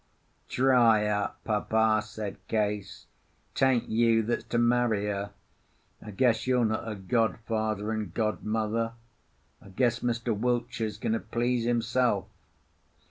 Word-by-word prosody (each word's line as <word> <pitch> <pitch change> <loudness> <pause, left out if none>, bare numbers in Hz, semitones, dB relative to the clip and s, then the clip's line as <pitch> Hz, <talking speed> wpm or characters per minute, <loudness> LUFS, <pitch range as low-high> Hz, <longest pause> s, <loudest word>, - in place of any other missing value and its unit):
"Dry 120 -5 +4
up, 105 -1 -2
Papa," 110 0 +2
said 105 -1 -6
Case. 105 -2 -2 0.5
"'Tain't 130 -3 +2
you 115 0 +3
that's 120 +2 -2
to 120 - -2
marry 120 -3 +2
her. 100 0 -2 0.7
I 105 - -10
guess 115 +4 +1
you're 125 -2 +3
not 110 0 -1
her 110 -1 -4
godfather 110 +1 -1
and 110 -2 -3
godmother. 110 +1 -1 0.7
I - - -14
guess 120 +4 +1
Mr. 120 -1 -1
Wiltshire's 120 -1 -1
going 110 - -1
to 115 - 0
please 120 0 -1
himself." 120 -2 +1
110 Hz, 125 wpm, -28 LUFS, 105-120 Hz, 0.7 s, Dry